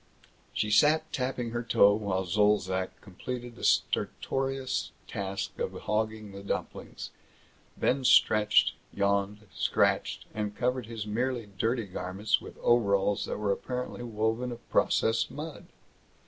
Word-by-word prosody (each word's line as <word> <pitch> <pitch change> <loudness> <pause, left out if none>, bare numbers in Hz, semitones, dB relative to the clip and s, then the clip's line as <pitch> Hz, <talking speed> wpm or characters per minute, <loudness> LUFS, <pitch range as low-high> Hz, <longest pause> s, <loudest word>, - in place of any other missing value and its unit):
She 105 0 -1
sat 155 +7 +4
tapping 125 -2 -2
her 120 0 -2
toe 100 -3 +5
while 100 -3 -1
Zolzac 95 -1 +1
completed 120 +5 -6
the - - -12
stertorous 135 -1 0 0.2
task 100 0 -4
of - - -2
hogging 110 -1 -2
the 100 0 -8
dumplings, 100 - -5 0.7
then 130 +1 +1
stretched, 105 -3 +5 0.2
yawned, 100 +1 0
scratched, - - +1
and 105 -1 -3
covered 125 -2 0
his 115 -2 -5
merely 120 +2 -1
dirty 110 +4 -1
garments 95 +2 -1
with - - -11
overalls 100 -4 +3
that - - -4
were 105 -1 0
apparently 125 +4 -4
woven 115 +1 -1
of 120 0 -10
processed 115 0 +2
mud. 150 +1 -7
110 Hz, 125 wpm, -29 LUFS, 100-125 Hz, 0.7 s, toe